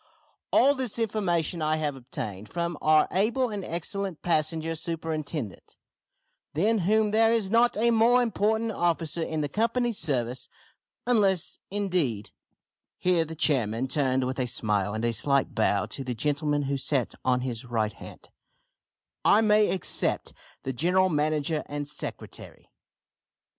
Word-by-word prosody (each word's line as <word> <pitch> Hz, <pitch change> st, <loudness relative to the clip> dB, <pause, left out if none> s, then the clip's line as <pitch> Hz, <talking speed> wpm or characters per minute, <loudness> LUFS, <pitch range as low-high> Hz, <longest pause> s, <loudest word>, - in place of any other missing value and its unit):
"All 280 Hz, -, +5 dB
this 260 Hz, -5 st, -4 dB
information 185 Hz, -7 st, 0 dB
I 155 Hz, 0 st, +1 dB
have 150 Hz, -3 st, -2 dB
obtained 115 Hz, -6 st, -7 dB
from 170 Hz, 0 st, -2 dB
our 155 Hz, 0 st, +4 dB
able 230 Hz, +6 st, +1 dB
and 205 Hz, -2 st, -4 dB
excellent 185 Hz, +1 st, -3 dB
passenger 165 Hz, -1 st, 0 dB
superintendent, 155 Hz, -, -5 dB, 0.8 s
than 215 Hz, +7 st, +2 dB
whom 215 Hz, -1 st, +3 dB
there 225 Hz, +1 st, +4 dB
is 220 Hz, -4 st, 0 dB
not 235 Hz, 0 st, +3 dB
a 235 Hz, +2 st, +3 dB
more 230 Hz, +2 st, +5 dB
important 220 Hz, 0 st, 0 dB
officer 170 Hz, -3 st, -1 dB
in 160 Hz, -1 st, -2 dB
the 145 Hz, -, -1 dB
Company's 230 Hz, -, 0 dB
service, 125 Hz, -4 st, -1 dB, 0.6 s
unless, 200 Hz, -8 st, +1 dB
indeed," 180 Hz, -, -1 dB, 0.7 s
(here 180 Hz, -2 st, +2 dB
the 160 Hz, +1 st, -8 dB
chairman 125 Hz, -5 st, +1 dB
turned 130 Hz, -2 st, +1 dB
with 130 Hz, +1 st, -3 dB
a 125 Hz, -, 0 dB
smile 105 Hz, -4 st, -1 dB
and 110 Hz, +2 st, -2 dB
a 120 Hz, -, +1 dB
slight 140 Hz, +3 st, +1 dB
bow 105 Hz, -3 st, +1 dB
to 135 Hz, -, -5 dB
the 125 Hz, -2 st, -4 dB
gentlemen 145 Hz, +3 st, 0 dB
who 140 Hz, 0 st, -1 dB
sat 135 Hz, -2 st, 0 dB
on 125 Hz, -1 st, +2 dB
his 125 Hz, -3 st, -4 dB
right 110 Hz, -3 st, -1 dB
hand) -, -, -12 dB, 0.9 s
"I 210 Hz, -, +5 dB
may 215 Hz, -1 st, +4 dB
except 190 Hz, -, 0 dB, 0.3 s
the 130 Hz, -, -3 dB
general 180 Hz, +7 st, +2 dB
manager 150 Hz, 0 st, 0 dB
and 145 Hz, 0 st, -4 dB
secretary. 150 Hz, -, -8 dB
160 Hz, 140 wpm, -27 LUFS, 130-205 Hz, 0.9 s, All